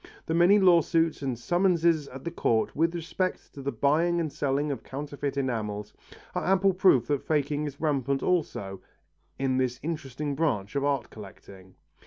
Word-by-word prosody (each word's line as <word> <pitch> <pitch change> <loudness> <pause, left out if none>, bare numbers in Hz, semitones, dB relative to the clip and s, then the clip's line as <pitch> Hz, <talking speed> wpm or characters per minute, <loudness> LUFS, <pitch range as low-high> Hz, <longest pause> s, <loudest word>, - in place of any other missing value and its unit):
The 160 - -2
many 175 +5 +5
lawsuits 170 -4 +3
and 130 -4 -2
summonses 170 - +2
at 135 0 -10
the 170 - -4
Courts 115 -9 0
with 165 +3 +1
respect 180 +2 -3
to 140 - -9
the 140 +1 -2
buying 165 +6 +2
and 155 -4 -2
selling 145 +1 0
of 135 - -4
counterfeit 140 0 -5
enamels, 110 -6 -3 0.4
are - - -2
ample 195 0 +3
proof 180 -10 +4
that 145 -2 -1
faking 150 -1 0
is 145 -1 -7
rampant 140 -3 0
also, 100 - -1 0.6
in 130 -1 0
this 125 -1 0
interesting 150 -2 -4
branch 135 -10 -1
of 140 - 0
art 140 -4 -1
collecting. 95 -2 -13
145 Hz, 165 wpm, -27 LUFS, 130-165 Hz, 0.6 s, many